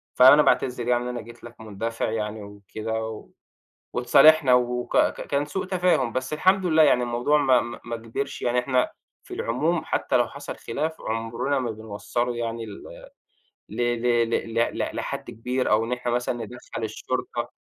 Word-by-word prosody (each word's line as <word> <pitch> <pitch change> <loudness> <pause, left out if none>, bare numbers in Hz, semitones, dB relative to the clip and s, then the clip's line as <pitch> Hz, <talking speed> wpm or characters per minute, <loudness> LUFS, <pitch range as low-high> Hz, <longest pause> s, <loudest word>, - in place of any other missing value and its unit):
فأنا 130 +4 +8
باعتذر 125 -3 +1
يعني 120 0 +2
إن - - -4
أنا 125 -1 -4
جيت 115 +2 -14
لك 120 -1 -12
مندفع 110 +2 -3
يعني 105 -1 -3
وكده." 105 +2 -5
و 110 -1 -8 0.6
واتصالحنا 135 +2 +6
وك 125 0 0
ك - - +2
كان 140 0 0
سوء 170 +6 -3
تفاهم 180 -10 +1
بس 130 +4 -3
الحمد 185 +4 +3
لله 160 -2 +5
يعني 140 -5 +4
الموضوع 120 +5 +1
ما 130 -4 +4
ما 120 0 -7
ما 120 -1 -4
كبرش، 115 +5 -5
يعني 125 0 +1
إحنا 125 0 +1 0.3
في - - -8
العموم 155 +8 0
حتى - - 0
لو 120 -2 +2
حصل 140 +3 -8
خلاف، 155 +7 -3
عُمرنا 115 +5 -2
ما 125 -3 -2
بنوصّله 110 +3 -3
يعني 115 -1 -3
ل 100 -2 -10 0.9
ل 105 - -9
ل 120 -1 +1
ل 115 -1 -2
ل 115 +1 0
ل - - -2
لحد - - -4
كبير، 125 +3 -2
أو 110 +1 +3
إن 115 - -4
إحنا 125 -1 -2
مثلًا 120 +1 0
ندخّل 120 0 -7
الشُرطة. 110 0 -4
120 Hz, 175 wpm, -25 LUFS, 115-130 Hz, 0.9 s, فأنا